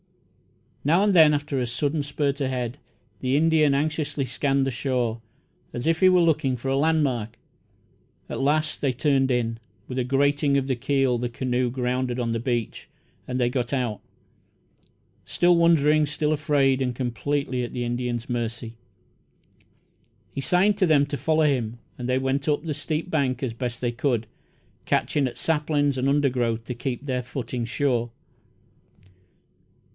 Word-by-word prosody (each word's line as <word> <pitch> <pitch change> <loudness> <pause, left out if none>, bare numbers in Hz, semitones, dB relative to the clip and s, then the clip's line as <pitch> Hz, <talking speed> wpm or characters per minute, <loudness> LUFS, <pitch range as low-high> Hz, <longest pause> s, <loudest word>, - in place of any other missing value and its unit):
Now 170 +7 +3
and 205 -1 +3
then, 160 -4 +7
after 145 -2 -1
a 125 - -1
sudden 145 +6 -1
spurt 140 0 -2
ahead, 130 -1 -2 0.4
the 130 +2 +1
Indian 155 -2 +3
anxiously 150 -1 -1
scanned 135 0 0
the 135 - -1
shore, 120 -3 -1 0.5
as 120 - -4
if 165 0 +2
he 185 - +6
were 180 -1 +5
looking 155 -6 +2
for 135 +3 -4
a 135 - +1
landmark. 135 -7 +1 0.9
At - - -5
last 155 +3 0
they 135 -3 +1
turned 135 0 +2
in. 115 -2 0 0.3
With 130 0 -3
a - - +1
grating 140 +2 +2
of 135 - 0
the 135 -1 0
keel 130 0 +1
the 120 0 -2
canoe 125 +1 -1
grounded 125 0 -2
on 120 -1 -1
the 115 - -1
beach, 120 -2 -3 0.4
and 125 0 -2
they 120 - +3
got 125 0 -2
out, 120 -6 -1 1.2
still 175 0 +3
wondering, 155 -3 +4
still 150 +1 -1
afraid, 145 -3 +2
and 125 -2 -1
completely 130 +1 -2
at 120 - -6
the 125 - -2
Indian's 120 0 -3
mercy. 115 -1 -4 1.6
He 135 - -3
signed 195 +7 +2
to 185 - +4
them 145 -3 +4
to 145 - -4
follow 160 +1 +2
him, 120 -5 0 0.2
and 125 0 -4
they 125 - +2
went 135 +1 -1
up 150 0 +1
the 160 -2 -2
steep 160 +4 -3
bank 135 -4 0
as 125 -3 -2
best 120 0 -4
they 120 -1 0
could, 120 -2 -1 0.6
catching 140 -3 +1
at 125 - -7
saplings 150 -3 +1
and 130 +1 0
undergrowth 125 -5 +1
to 125 - -4
keep 125 +2 -4
their 130 -2 -1
footing 125 -1 -4
sure. 120 -1 0
135 Hz, 160 wpm, -25 LUFS, 125-150 Hz, 1.6 s, then